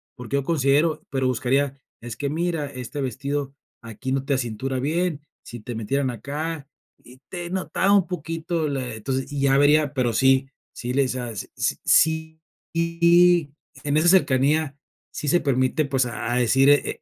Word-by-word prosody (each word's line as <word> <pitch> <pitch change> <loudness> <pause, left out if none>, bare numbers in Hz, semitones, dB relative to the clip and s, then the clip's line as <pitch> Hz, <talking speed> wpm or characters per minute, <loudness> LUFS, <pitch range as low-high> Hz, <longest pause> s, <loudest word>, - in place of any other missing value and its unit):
porque 125 0 -5
yo 140 - -1
considero", 150 +1 +1
pero 130 -1 0
buscaría: 130 +3 0 0.3
"Es 120 -1 -7
que 140 +4 -3
mira, 165 0 -1
este 130 +1 -6
vestido 140 +2 -3 0.3
aquí 115 +3 -6
no 135 0 0
te 140 - -1
acintura 130 +1 -2
bien, 160 +3 -1 0.2
si 120 - -9
te 115 +2 -7
metieran 130 +5 -1
acá 145 +5 -5 0.3
y 125 +1 -17
te 175 -2 -6
notaba 190 +1 0
un 200 -3 +4
poquito 165 -1 -3
la" 130 -4 -3
Entonces, 130 +5 -3
y 145 -1 -3
ya 135 0 +3
vería 145 0 +4
pero 125 -4 0
sí, 135 +3 +3 0.2
sí 125 +1 -5
le 140 +1 +3
hice 130 -1 -2
a 120 -1 -4
s 105 - -7
s - - 0
sí, 160 0 +2 0.3
y 170 -1 +3 0.3
en 145 0 0
esa 160 +3 +3
cercanía 150 -4 +3 0.3
sí 150 - -5
se 175 +5 +3
permite, 135 +2 +1
pues, 135 -2 +1
a 120 0 -4
decir 125 +3 +4
e 145 0 +2
140 Hz, 175 wpm, -23 LUFS, 130-160 Hz, 0.3 s, un